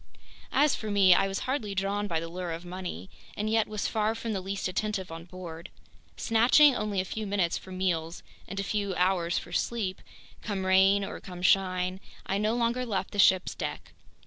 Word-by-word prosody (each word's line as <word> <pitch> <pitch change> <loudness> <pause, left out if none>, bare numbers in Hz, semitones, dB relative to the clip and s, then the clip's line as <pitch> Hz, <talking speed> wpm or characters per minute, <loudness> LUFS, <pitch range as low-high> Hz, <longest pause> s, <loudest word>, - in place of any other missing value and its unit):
As 290 +1 +4
for 215 - -4
me, 195 -3 +6
I 195 +2 +3
was 195 0 -3
hardly 240 -7 -2
drawn 200 +2 -1
by 165 -4 0
the 165 - -5
lure 175 0 -4
of 165 +2 -7
money 175 - -6 0.3
and 210 - -1
yet 220 0 +2
was 215 -1 -2
far 220 0 0
from 225 -1 -3
the 195 - -2
least 195 +1 -3
attentive 190 -1 -2
on 165 0 -8
board. 175 -1 -9 0.5
Snatching 250 +5 +5
only 210 -2 -1
a 185 - 0
few 215 +3 -4
minutes 195 -4 +1
for 190 - -8
meals 175 -3 -2 0.2
and 195 +1 -5
a - - -1
few 200 -2 -2
hours 180 -2 +1
for 170 - -5
sleep, 195 -1 -2 0.4
come 195 -3 -3
rain 190 +1 +4
or - - -7
come 180 -1 -9
shine, 185 -1 +2 0.3
I 195 - -1
no 215 +2 +1
longer 240 +1 0
left 195 -6 -2
the 205 - -5
ship's 190 -1 +5
deck. - - -6
195 Hz, 200 wpm, -28 LUFS, 180-210 Hz, 0.5 s, me